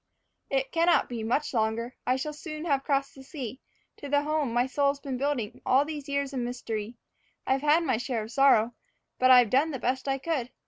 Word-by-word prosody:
It 270 -1 -1
cannot 335 +1 +3
be 235 -2 -4
much 245 +8 -1
longer. 230 +2 -1
I 255 - +3
shall 300 +3 -3
soon 305 +1 -7
have 280 -4 +1
crossed 275 -1 0
the 270 - -13
sea, 265 -3 -7 0.4
To 285 - -8
the 285 +1 +2
home 305 -4 0
my 240 +1 +2
soul's 280 +2 0
been 275 -2 -5
building 270 -6 -2
all 270 +3 +3
these 295 -2 -6
years 280 0 -1
of 260 - -2
mystery. 235 -2 -4 0.5
I've 265 0 +1
had 300 +3 +4
my 260 -8 +1
share 240 -2 -2
of 220 - -9
sorrow, 245 -4 +4 0.5
but 255 - +4
I've 250 -4 +7
done 280 +5 +3
the 280 - -3
best 255 +2 -2
I 270 0 +1
could. 270 -3 -2
270 Hz, 210 wpm, -28 LUFS, 245-290 Hz, 0.5 s, I've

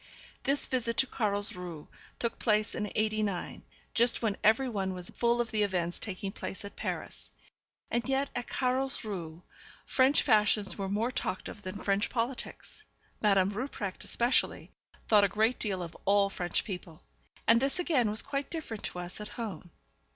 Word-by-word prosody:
This 280 +1 +3
visit 235 -3 0
to 265 - +6
Carlsruhe 200 - -2 0.3
took 235 - -2
place 215 -2 +2
in 210 - -3
'89, 215 -3 0 0.3
just 235 0 +4
when 215 -3 +1
every 225 +5 +5
one 195 -5 -2
was 180 -1 -5
full 235 0 +2
of 235 -2 0
the 215 - +1
events 180 -4 0
taking 195 -1 -4
place 195 - -6
at 200 - -8
Paris; - - -5 0.6
and 235 +2 0
yet 270 +1 +1
at 245 0 -3
Carlsruhe 215 -11 -2 0.4
French 265 +2 +4
fashions 210 -5 +3
were 195 -1 -3
more 220 +5 0
talked 185 -7 -2
of 210 - -8
than 185 0 -5
French 200 0 +1
politics. 250 - -3 0.4
Madame 195 -2 +4
Rupprecht, 210 -4 -4
especially, 240 +2 +1 0.4
thought 210 -2 +6
a - - +6
great 220 +5 +2
deal 190 -4 -1
of 165 - -8
all 200 0 +4
French 175 -2 -1
people. 180 -5 -7 0.4
And 230 +1 +6
this 275 +4 +1
again 295 -11 +2
was 215 +1 +2
quite 280 0 -2
different 305 -10 -4
to - - -4
us 180 +3 -5
at 210 - -5
home. 195 -7 -5
215 Hz, 165 wpm, -31 LUFS, 195-240 Hz, 0.6 s, to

